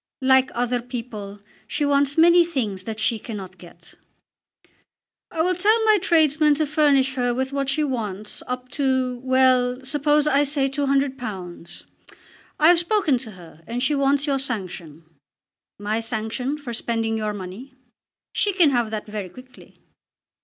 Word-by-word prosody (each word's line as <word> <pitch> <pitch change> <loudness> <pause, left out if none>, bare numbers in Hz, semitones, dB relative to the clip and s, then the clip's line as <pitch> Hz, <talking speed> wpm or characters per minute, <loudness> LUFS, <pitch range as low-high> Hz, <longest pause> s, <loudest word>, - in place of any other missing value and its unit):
"Like 265 0 +4
other 245 0 0
people 230 -5 -7 0.3
she 295 +6 -1
wants 285 0 +2
many 345 +2 +6
things 220 - -3
that 220 -1 -5
she 220 +1 0
cannot 195 -4 -8
get." 175 0 -16 1.4
"I 320 - -1
will 365 +2 +1
tell 430 +5 +2
my 430 -1 +5
tradesmen 310 -4 +3
to 310 +1 0
furnish 285 -3 +2
her 245 -2 0
with 265 +2 -2
what 275 -1 -1
she 300 +3 +1
wants, 215 -7 -4
up 250 0 -5
to, 260 -2 0
well, 255 0 +2
suppose 295 +2 +2
I 285 -2 +3
say 285 -1 +1
£200. 265 - -3 0.8
I 310 - +5
have 350 -1 +6
spoken 340 - +1
to 235 -3 -6
her 170 -3 -15
and 240 +2 -3
she 295 - +2
wants 280 0 +2
your 275 -2 0
sanction." 180 - -6 0.7
"My 210 +2 -2
sanction 230 +5 -3
for 275 -5 -7
spending 225 -1 -1
your 215 -1 -2
money? 205 +8 -9 0.6
She 410 -1 +1
can 345 -6 +4
have 240 -4 0
that 215 -1 -5
very 210 -3 -6
quickly." 255 +5 -16
260 Hz, 155 wpm, -23 LUFS, 220-290 Hz, 1.4 s, many